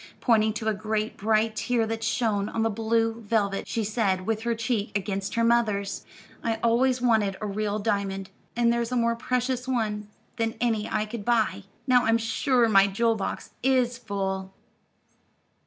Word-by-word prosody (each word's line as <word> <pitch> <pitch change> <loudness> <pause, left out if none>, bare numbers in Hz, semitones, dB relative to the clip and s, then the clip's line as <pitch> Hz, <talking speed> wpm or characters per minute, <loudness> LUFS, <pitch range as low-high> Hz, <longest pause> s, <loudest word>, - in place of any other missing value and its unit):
Pointing 220 -3 +3
to 220 0 -4
a 220 - +3
great, 215 +1 -2
bright 220 +1 +1
tear 230 +1 +1
that 225 0 -4
shone 220 -3 0
on 225 - -1
the 225 - +1
blue 225 +1 0
velvet, 205 -2 0
she 225 - -1
said, 200 -4 0
with 220 0 -1
her 235 0 0
cheek 225 -1 -1
against 195 0 -3
her 230 - +2
mother's: 220 -4 +1 0.4
"I 225 -1 0
always 250 +2 +2
wanted 215 -5 +2
a 215 - -4
real 210 0 -1
diamond, 195 -2 -2 0.2
and 235 0 +3
there's 235 0 -1
a - - 0
more 235 -1 +2
precious 250 +1 -1
one 215 -5 -1 0.3
than 225 -1 -1
any 225 -3 0
I 215 0 0
could 215 0 -6
buy. 215 -4 +1 0.2
Now 250 -2 +4
I'm 225 +1 +4
sure 235 +2 +2
my 195 -2 +5
jewel 230 +4 +1
box 200 - -4
is 255 -2 +2
full." 190 -3 -3
225 Hz, 170 wpm, -26 LUFS, 205-235 Hz, 0.4 s, my